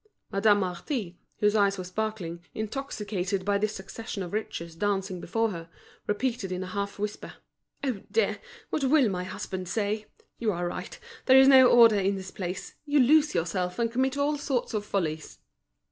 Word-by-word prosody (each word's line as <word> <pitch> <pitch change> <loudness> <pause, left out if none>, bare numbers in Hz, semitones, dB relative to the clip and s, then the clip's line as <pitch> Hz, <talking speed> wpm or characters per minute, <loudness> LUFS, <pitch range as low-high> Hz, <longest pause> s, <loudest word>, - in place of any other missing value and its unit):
Madame 205 +1 +4
Marty, 180 - -3 0.2
whose 210 0 +3
eyes 200 -1 +3
were 185 - -4
sparkling, 180 -3 -4
intoxicated 210 -5 -3
by 200 0 +2
this 215 +1 -1
succession 195 +1 -6
of 175 - -8
riches 170 -6 -4
dancing 195 -1 -1
before 225 +5 0
her, 165 -2 -7 0.4
repeated 210 -2 -1
in 185 0 -2
a 185 - -7
half 200 0 -3
whisper: 210 +1 -5 0.5
"Oh, 250 -8 -1
dear! 455 - +1 0.3
What 295 - -1
will 270 -3 +4
my 180 -2 -3
husband 185 -1 -5
say? 215 +1 -1 0.3
You 225 -2 +1
are 175 0 -2
right, 180 +3 -6 0.3
there 260 0 +8
is 265 0 +8
no 260 -2 +9
order 230 -4 +7
in 195 +1 +1
this 190 -1 -7
place. 180 0 -5
You 290 -1 +2
lose 300 +4 +5
yourself, 180 +2 -1
and 230 -1 0
commit 260 +3 0
all 290 +1 +1
sorts 265 -5 -1
of 210 -1 -1
follies." 160 -7 -3
205 Hz, 175 wpm, -28 LUFS, 185-235 Hz, 0.5 s, no